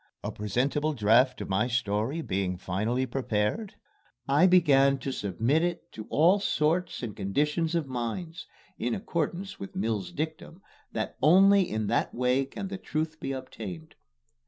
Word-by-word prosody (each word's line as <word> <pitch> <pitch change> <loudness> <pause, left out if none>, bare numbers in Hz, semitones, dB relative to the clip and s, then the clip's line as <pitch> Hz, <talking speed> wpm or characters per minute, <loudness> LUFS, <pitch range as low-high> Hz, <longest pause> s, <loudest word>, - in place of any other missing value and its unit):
A - - -3
presentable 135 +9 -1
draft 125 +2 +3
of - - -6
my 100 +5 +1
story 120 +5 -1
being 95 -4 -2
finally 110 +8 -1
prepared, 125 - -2 0.5
I 145 +7 +5
began 140 -7 +5
to 135 - -4
submit 115 - 0
it 175 -1 -3
to 110 - -9
all 175 +7 +4
sorts 170 -3 0
and 110 -4 -5
conditions 150 - 0
of 165 -3 0
minds 135 +7 -5 0.3
(in 120 - -1
accordance 185 0 -3
with 100 - -8
Mill's 105 -1 -2
dictum 160 +4 -5 0.3
that 110 - -4
only 190 +5 +6
in 110 0 -2
that - - 0
way 125 +2 +2
can 195 +8 -6
the 195 -1 -5
truth 155 -1 -3
be 135 - -4
obtained). 105 -11 -7
135 Hz, 150 wpm, -28 LUFS, 110-165 Hz, 0.5 s, only